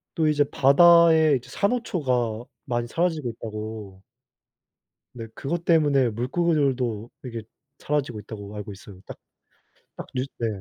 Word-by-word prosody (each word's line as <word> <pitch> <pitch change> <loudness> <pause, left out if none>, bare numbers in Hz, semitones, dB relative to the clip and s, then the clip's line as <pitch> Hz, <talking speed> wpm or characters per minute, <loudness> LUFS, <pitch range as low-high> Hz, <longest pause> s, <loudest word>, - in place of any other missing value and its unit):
또 160 -2 +2
이제 145 -1 +3
바다에 160 +1 +6
이제 125 0 -8
"산호초가 130 - -1 0.2
많이 120 -2 -2
사라지고 160 -1 -1
있다."고 110 -3 -8 1.1
네 115 -2 -7
그것 170 +7 -4
때문에 145 -6 +3
"물고기들도 125 -3 -1
이게 115 -3 -6 0.4
사라지고 140 -7 -2
있다."고 105 0 -9
알고 105 0 -6
있어요. 95 -1 -13
딱 - - -10 0.8
딱 - - -7
뉴스 130 +2 -2
네. 115 - 0
125 Hz, 290 characters per minute, -24 LUFS, 110-155 Hz, 1.1 s, 바다에